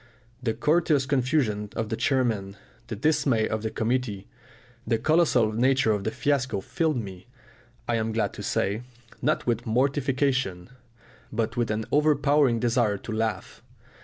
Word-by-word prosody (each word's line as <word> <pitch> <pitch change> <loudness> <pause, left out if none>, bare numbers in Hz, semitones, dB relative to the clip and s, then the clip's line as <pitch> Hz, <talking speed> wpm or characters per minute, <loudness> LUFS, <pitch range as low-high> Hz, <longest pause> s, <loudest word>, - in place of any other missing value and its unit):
The 115 -3 -1
courteous 150 +1 +2
confusion 125 -6 0
of 110 -1 -2
the 110 - -1
chairman, 115 -5 0 0.3
the 110 - -4
dismay 140 -3 +2
of 110 0 -2
the 110 - -2
committee, 110 -4 -2 0.6
the 115 - +2
colossal 130 -5 +3
nature 125 +1 +2
of 105 -2 -1
the - - +1
fiasco 130 -7 0
filled 155 - -1
me, 95 -4 -7 0.6
I 120 - +1
am 110 0 -1
glad 110 -3 -1
to - - -8
say, 100 +4 -1 0.4
not 150 +5 0
with 120 -1 -1
mortification, 130 -5 0 0.6
but 115 0 -2
with 120 -2 0
an 110 0 -1
overpowering 145 -4 +3
desire 115 -3 +1
to 110 - -8
laugh. 110 -3 -3
120 Hz, 145 wpm, -26 LUFS, 110-135 Hz, 0.6 s, colossal